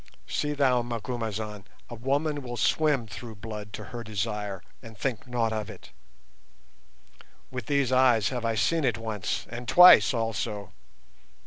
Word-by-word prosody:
See 150 0 -2
thou, 130 -4 +3
Macumazahn, 110 -3 -4 0.2
a - - -9
woman 140 +5 -1
will 120 -2 -6
swim 145 0 +2
through 110 +1 -9
blood 105 -1 -8
to - - -6
her 120 -1 -5
desire, 105 -2 -4 0.2
and 115 -3 -12
think 120 -1 -3
nought 115 -2 0
of 110 -2 -3
it. - - -12 1.6
With 125 -1 -6
these 140 -3 +1
eyes 125 -5 +4
have 125 -3 -4
I 115 -1 0
seen 165 +7 +1
it 120 -5 +1
once, 110 -3 -3
and 120 0 -7
twice 180 +5 +8
also. 110 -4 -3
115 Hz, 145 wpm, -27 LUFS, 110-130 Hz, 1.6 s, twice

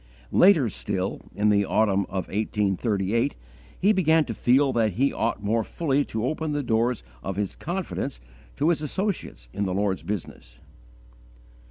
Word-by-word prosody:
Later 175 -9 +6
still, 95 -2 -3
in 105 +1 +2
the 100 -1 +4
autumn 100 0 +2
of 95 0 -3
1838, 105 +3 0 0.4
he 205 +3 +4
began 160 -5 +3
to 115 - -4
feel 130 +5 +3
that 110 -4 +2
he 135 +8 +1
ought 110 -2 -1
more 110 +2 +1
fully 145 +2 0
to 110 +1 -3
open 155 +2 -2
the 145 -1 -1
doors 120 0 +1 0.2
of 95 - -4
his 100 -1 -2
confidence 175 - -4 0.4
to 150 +4 +2
his 170 -3 +1
associates 155 - -3
in 100 - -1
the 90 - -2
Lord's 100 -1 0
business. 80 -11 -6
110 Hz, 155 wpm, -25 LUFS, 100-145 Hz, 0.4 s, Later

